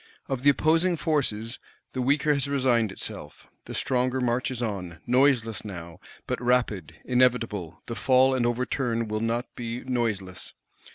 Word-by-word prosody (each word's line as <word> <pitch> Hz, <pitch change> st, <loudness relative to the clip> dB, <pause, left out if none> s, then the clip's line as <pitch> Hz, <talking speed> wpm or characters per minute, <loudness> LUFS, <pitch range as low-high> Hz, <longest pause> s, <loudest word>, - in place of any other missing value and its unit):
Of 135 Hz, -2 st, -2 dB
the 145 Hz, -, +5 dB
opposing 165 Hz, +5 st, +3 dB
forces 130 Hz, -7 st, 0 dB, 0.3 s
the 130 Hz, -, -2 dB
weaker 145 Hz, +3 st, +3 dB
has 140 Hz, -1 st, -1 dB
resigned 125 Hz, -6 st, +2 dB
itself; -, -, -8 dB, 0.2 s
the -, -, -7 dB
stronger 130 Hz, 0 st, 0 dB
marches 125 Hz, +1 st, 0 dB
on, 95 Hz, -8 st, -4 dB
noiseless 125 Hz, -3 st, +3 dB
now, 85 Hz, -4 st, -8 dB, 0.3 s
but 125 Hz, -, -3 dB
rapid, 120 Hz, -9 st, +1 dB
inevitable: 115 Hz, -9 st, +1 dB
the 115 Hz, -, -5 dB
fall 130 Hz, +2 st, +4 dB
and 130 Hz, -2 st, +1 dB
overturn 120 Hz, -1 st, 0 dB
will 110 Hz, 0 st, -2 dB
not 115 Hz, +2 st, 0 dB
be 120 Hz, 0 st, -5 dB
noiseless. 110 Hz, -7 st, -2 dB
125 Hz, 140 wpm, -26 LUFS, 110-130 Hz, 0.3 s, the